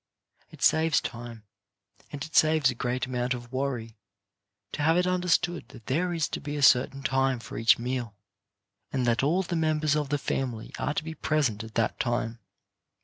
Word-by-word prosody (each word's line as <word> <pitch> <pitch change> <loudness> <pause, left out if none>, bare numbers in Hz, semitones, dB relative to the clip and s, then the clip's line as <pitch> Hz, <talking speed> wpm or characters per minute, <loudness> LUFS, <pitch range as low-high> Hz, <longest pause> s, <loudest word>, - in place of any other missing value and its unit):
It - - -9
saves 160 0 +4
time, 120 -2 -7 0.7
and 145 -1 -5
it 155 - -12
saves 155 -4 +5
a - - -5
great 125 +1 -2
amount 125 0 -1
of 120 -1 -10
worry, 125 -5 -3 0.7
to - - -4
have 160 +3 +3
it 180 - +3
understood 180 -1 +1
that 115 -3 -14
there 175 +7 0
is 165 -3 0
to - - -4
be 145 0 -5
a 145 - -1
certain 135 +2 +4
time 135 0 +1
for 115 - -10
each 115 +1 +4
meal, 120 -3 -3 0.8
and 130 -2 0
that 120 -1 +2
all 165 +8 +2
the 175 -1 -3
members 155 -2 +1
of 150 -2 -1
the 145 - +1
family 125 -5 -3
are 150 - -1
to - - -1
be 160 0 -6
present 140 -10 0
at 110 0 -11
that 115 -2 0
time. 120 -1 -1
135 Hz, 190 wpm, -27 LUFS, 120-155 Hz, 0.8 s, saves